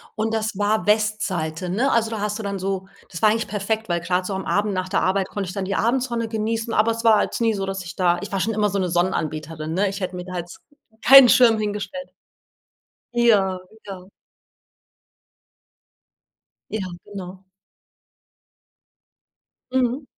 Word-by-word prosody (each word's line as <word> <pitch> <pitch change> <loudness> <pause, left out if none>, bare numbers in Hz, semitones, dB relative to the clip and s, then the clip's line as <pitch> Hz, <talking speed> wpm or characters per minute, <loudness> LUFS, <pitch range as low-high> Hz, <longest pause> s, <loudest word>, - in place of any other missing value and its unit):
Und 220 +1 -1
das 220 -2 -2
war 205 -2 +1
Westseite, 195 -6 0
ne? 235 +10 +1
Also, 225 -1 +2
da 220 -2 -4
hast 210 +1 -2
du - - -5
dann 200 -1 -3
so 190 0 -3 0.2
das 170 - -7
war 215 - +6
eigentlich 225 +1 -2
perfekt, 215 +2 -2
weil 170 0 +1
grad 180 +2 -1
so 195 - -3
am 190 0 -4
Abend 205 +4 0
nach 185 -1 -2
der 190 - 0
Arbeit 190 0 +1
konnte 195 -3 -4
ich - - -6
dann 195 -1 -3
die 195 +1 -2
Abendsonne 235 0 0
genießen, 225 +1 -2
aber 215 +2 +3
es 230 0 -4
war 225 -2 +6
halt - - -1
nie 225 -1 +3
so, 195 -2 -3
dass 195 0 -4
ich 175 +1 -9
da 175 -2 +3
ich 205 - -7
war 195 - -1
schon 225 +4 0
immer 210 -1 +1
so 200 0 -1
'ne 185 - 0
Sonnenanbeterin, 160 -3 -2
ne? 195 +3 +1
Ich 195 +1 -5
hätte 185 -1 -4
mir 180 - -5
da 185 0 -6
jetzt 175 0 -8 0.4
keinen 270 +1 +9
Schirm 230 -2 +5
hingestellt. 210 +5 -4 1.0
Ja, 205 -6 +3 0.3
ja. 190 -2 -9 2.6
Ja, 220 - -2 0.3
genau. 190 -2 -9 2.3
Mhm. 260 +2 0
200 Hz, 175 wpm, -22 LUFS, 185-220 Hz, 2.6 s, keinen